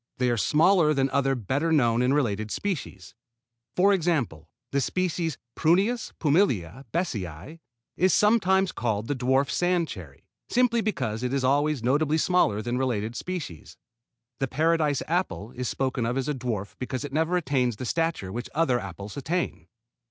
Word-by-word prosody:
They 125 Hz, -1 st, +1 dB
are -, -, +2 dB
smaller 155 Hz, -, +3 dB
than 135 Hz, 0 st, +1 dB
other 135 Hz, -1 st, +2 dB
better 130 Hz, -, -1 dB
known 120 Hz, -6 st, +3 dB
and 125 Hz, +1 st, +2 dB
related 110 Hz, -7 st, 0 dB
species. 145 Hz, -, -4 dB, 0.6 s
For 200 Hz, +3 st, +5 dB
example, 140 Hz, -, -1 dB, 0.2 s
the 140 Hz, -, +1 dB
species 170 Hz, -1 st, -1 dB, 0.2 s
Prunus 200 Hz, +8 st, +2 dB
pumila 140 Hz, -, +1 dB
besseyi 110 Hz, -, -4 dB, 0.4 s
is 185 Hz, +2 st, +3 dB
sometimes 195 Hz, -3 st, +3 dB
called 110 Hz, -2 st, -2 dB
the -, -, 0 dB
dwarf 130 Hz, +1 st, +1 dB
sand 175 Hz, -2 st, +1 dB
cherry, 80 Hz, -, -10 dB, 0.2 s
simply 235 Hz, -1 st, +3 dB
because 130 Hz, -, -2 dB
it 125 Hz, 0 st, -2 dB
is 135 Hz, -, 0 dB
always 145 Hz, 0 st, +1 dB
notably 145 Hz, +5 st, +2 dB
smaller 155 Hz, -, +2 dB
than 120 Hz, +2 st, -2 dB
related 115 Hz, -3 st, -1 dB
species. 160 Hz, -, -6 dB, 0.6 s
The 135 Hz, -, 0 dB
Paradise 155 Hz, 0 st, +1 dB
apple 165 Hz, -, -2 dB
is 125 Hz, -1 st, -4 dB
spoken 130 Hz, -3 st, -1 dB
of 125 Hz, +3 st, -1 dB
as 135 Hz, +1 st, -1 dB
a 150 Hz, -, 0 dB
dwarf 115 Hz, -7 st, -4 dB
because 130 Hz, +2 st, -3 dB
it 140 Hz, -, -8 dB
never 160 Hz, +4 st, +1 dB
attains 130 Hz, -7 st, 0 dB
the 125 Hz, -, -6 dB
stature 165 Hz, -, -1 dB
which 120 Hz, +4 st, -5 dB
other 135 Hz, -6 st, +2 dB
apples 100 Hz, -, -8 dB
attain. 140 Hz, -, -2 dB
135 Hz, 160 wpm, -26 LUFS, 120-165 Hz, 0.6 s, For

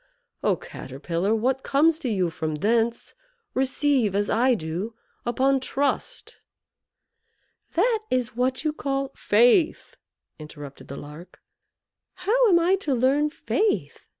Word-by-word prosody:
Oh, -, -, +3 dB
Caterpillar; 170 Hz, +10 st, -3 dB
what 255 Hz, +4 st, 0 dB
comes 310 Hz, +4 st, +3 dB
to 265 Hz, -, -3 dB
you 185 Hz, -6 st, 0 dB
from 160 Hz, -1 st, -3 dB
thence, 230 Hz, +7 st, 0 dB, 0.4 s
receive, 265 Hz, -5 st, +1 dB
as 205 Hz, 0 st, 0 dB
I 250 Hz, +2 st, +3 dB
do, 185 Hz, +5 st, -4 dB, 0.3 s
upon 265 Hz, +3 st, +2 dB
trust." 280 Hz, -, -2 dB, 1.4 s
"That 445 Hz, +6 st, +2 dB
is 250 Hz, -2 st, -1 dB
what 255 Hz, +2 st, 0 dB
you 310 Hz, -1 st, 0 dB
call 275 Hz, -2 st, -2 dB
" -, -, -39 dB
"Faith," 245 Hz, -, +3 dB, 0.4 s
interrupted 145 Hz, -2 st, -10 dB
the 140 Hz, -, -7 dB
Lark. 150 Hz, +5 st, -11 dB, 0.8 s
"How 435 Hz, +6 st, +2 dB
am 350 Hz, -, +6 dB
I 360 Hz, +3 st, +3 dB
to 305 Hz, -9 st, -1 dB
learn 275 Hz, +5 st, +2 dB
Faith?" 410 Hz, +6 st, -1 dB
255 Hz, 125 wpm, -25 LUFS, 200-295 Hz, 1.4 s, am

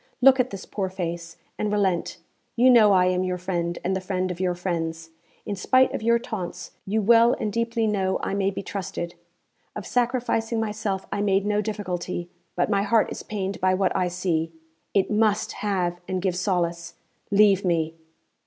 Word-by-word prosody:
Look 265 Hz, +1 st, +6 dB
at 255 Hz, 0 st, +2 dB
this 195 Hz, -1 st, -8 dB
poor 195 Hz, -2 st, -3 dB
face, 170 Hz, -2 st, -5 dB, 0.2 s
and 210 Hz, -, 0 dB
relent. 195 Hz, -4 st, 0 dB, 0.4 s
You 255 Hz, +1 st, +6 dB
know 220 Hz, -4 st, +7 dB
I 185 Hz, -2 st, +5 dB
am 185 Hz, 0 st, +1 dB
your 180 Hz, -1 st, -1 dB
friend 175 Hz, -1 st, -2 dB
and 190 Hz, +2 st, 0 dB
the 190 Hz, -, -2 dB
friend 185 Hz, -1 st, -2 dB
of 175 Hz, -, -7 dB
your 180 Hz, -1 st, 0 dB
friends; 165 Hz, -2 st, -3 dB, 0.3 s
in 205 Hz, -, -3 dB
spite 255 Hz, +7 st, +3 dB
of -, -, -3 dB
your 235 Hz, +1 st, +3 dB
taunts 215 Hz, -7 st, -6 dB, 0.2 s
you 215 Hz, +2 st, 0 dB
well 235 Hz, +3 st, +6 dB
and 210 Hz, -2 st, -3 dB
deeply 230 Hz, 0 st, 0 dB
know 195 Hz, -3 st, 0 dB
I -, -, -2 dB
may 195 Hz, -1 st, +1 dB
be 195 Hz, 0 st, -5 dB
trusted. 190 Hz, -3 st, -5 dB, 0.6 s
Of 210 Hz, -, -6 dB
sacrificing 235 Hz, -2 st, 0 dB
myself 210 Hz, -3 st, -2 dB
I 205 Hz, -, -1 dB
made 200 Hz, -1 st, +2 dB
no 210 Hz, 0 st, +1 dB
difficulty, 180 Hz, -4 st, -4 dB, 0.2 s
but 175 Hz, -, +1 dB
my 200 Hz, -2 st, +1 dB
heart 215 Hz, +2 st, +2 dB
is -, -, -5 dB
pained 200 Hz, -2 st, -4 dB
by 185 Hz, 0 st, +3 dB
what 190 Hz, -1 st, +1 dB
I 180 Hz, -, +1 dB
see. 175 Hz, -2 st, -1 dB, 0.4 s
It 195 Hz, +1 st, +2 dB
must 215 Hz, 0 st, +2 dB
have 180 Hz, -4 st, -2 dB
and 185 Hz, 0 st, -1 dB
give 185 Hz, -1 st, -1 dB
solace. 175 Hz, -2 st, -1 dB, 0.4 s
_Leave 200 Hz, -1 st, +5 dB
me! 165 Hz, -3 st, 0 dB
195 Hz, 185 wpm, -25 LUFS, 180-210 Hz, 0.6 s, know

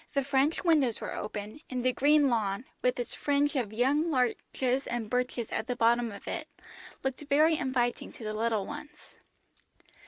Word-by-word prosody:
The 275 Hz, -, +2 dB
French 275 Hz, +3 st, +1 dB
windows 295 Hz, -10 st, +3 dB
were -, -, -5 dB
open, 210 Hz, +4 st, -5 dB
and 255 Hz, -1 st, -3 dB
the 255 Hz, -, +3 dB
green 290 Hz, +2 st, +4 dB
lawn, 220 Hz, -2 st, 0 dB, 0.2 s
with 250 Hz, 0 st, +1 dB
its 240 Hz, -, -3 dB
fringe 290 Hz, +1 st, +1 dB
of 240 Hz, -6 st, -1 dB
young 275 Hz, +8 st, +2 dB
larches 255 Hz, 0 st, 0 dB
and 240 Hz, -2 st, -2 dB
birches 250 Hz, -2 st, -1 dB
at 220 Hz, -, -2 dB
the 250 Hz, -, -1 dB
bottom 235 Hz, 0 st, +3 dB
of 200 Hz, -, -11 dB
it, -, -, -4 dB, 0.6 s
looked 265 Hz, +1 st, -2 dB
very 310 Hz, +3 st, +5 dB
inviting 255 Hz, -4 st, -1 dB
to -, -, -10 dB
the 215 Hz, 0 st, -3 dB
little 220 Hz, -2 st, 0 dB
ones. 295 Hz, +1 st, -10 dB
250 Hz, 175 wpm, -30 LUFS, 230-280 Hz, 0.6 s, very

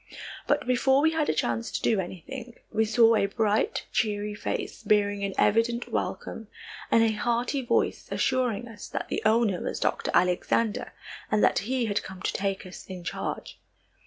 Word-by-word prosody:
But -, -, +2 dB
before 265 Hz, +2 st, +3 dB
we 320 Hz, -, +4 dB
had 320 Hz, -2 st, 0 dB
a -, -, +3 dB
chance 115 Hz, -5 st, -1 dB
to -, -, -3 dB
do 220 Hz, -, +2 dB
anything, 230 Hz, +7 st, -7 dB, 0.2 s
we 220 Hz, 0 st, +2 dB
saw 230 Hz, +1 st, +5 dB
a 200 Hz, -, +2 dB
bright, 215 Hz, +1 st, 0 dB
cheery 210 Hz, -1 st, 0 dB
face, 210 Hz, -, -4 dB
bearing 205 Hz, -1 st, +2 dB
an 195 Hz, -1 st, -2 dB
evident 230 Hz, +3 st, +2 dB
welcome, 225 Hz, -, -3 dB, 0.4 s
and 230 Hz, -, +5 dB
a 225 Hz, -, +3 dB
hearty 240 Hz, +5 st, 0 dB
voice 240 Hz, -, 0 dB
assuring 245 Hz, -4 st, 0 dB
us 215 Hz, -3 st, -9 dB
that -, -, -4 dB
the -, -, -1 dB
owner 215 Hz, -4 st, +3 dB
was -, -, -3 dB
Dr. -, -, 0 dB
Alexander 185 Hz, +4 st, +1 dB, 0.4 s
and 215 Hz, -, +2 dB
that -, -, +4 dB
he 255 Hz, -2 st, +1 dB
had 205 Hz, -2 st, 0 dB
come 190 Hz, -1 st, -10 dB
to -, -, 0 dB
take 195 Hz, 0 st, -2 dB
us 185 Hz, -, -10 dB
in 185 Hz, -2 st, -7 dB
charge. -, -, -5 dB
220 Hz, 175 wpm, -27 LUFS, 200-235 Hz, 0.4 s, saw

